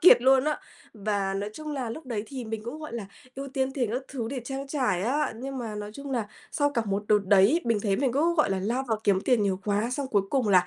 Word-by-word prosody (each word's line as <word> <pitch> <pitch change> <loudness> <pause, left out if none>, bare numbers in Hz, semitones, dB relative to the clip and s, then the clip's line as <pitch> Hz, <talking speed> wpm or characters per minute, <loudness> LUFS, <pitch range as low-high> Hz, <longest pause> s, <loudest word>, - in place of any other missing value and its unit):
kiệt 340 -8 +8
luôn 265 +1 +5
á. 305 0 0 0.3
Và 200 -2 -1
nói 205 +2 -2
chung 305 +4 -6
là 260 -5 -2
lúc 300 +4 -7
đấy 220 -4 -2
thì 260 -1 -6
mình 220 -1 -4
cũng, 280 +6 -5
gọi 305 -5 -7
là, 225 -4 -4 0.3
ưu 275 +1 -5
tiên 265 0 -1
tiền 250 -5 0
các 255 +2 -1
thứ 235 -5 -3
để 265 -2 -3
trang 270 +2 -4
trải 255 - 0
á, 280 +5 +1
nhưng 265 +3 -5
mà 225 -4 -4
nói 210 0 -5
chung 280 +3 -7
là 235 -5 0 0.3
sau 290 -1 +2
cả 235 -4 0
một 200 +1 0
đợt 210 - +6
đấy 205 - +5
bình 230 -3 +2
thấy 195 -3 +2
mình 265 -3 +1
cứ, 325 +6 +2
gọi 305 -10 +3
là, 195 - +1
lao 240 +7 0
vào 220 - +1
kiếm 195 -2 +4
tiền 240 -3 +3
nhiều 195 -1 0
quá, 210 +3 +1
xong 275 +1 -2
cuối 200 -2 +3
cùng 260 -6 +2
là 180 -2 +5
240 Hz, 275 wpm, -27 LUFS, 205-275 Hz, 0.3 s, kiệt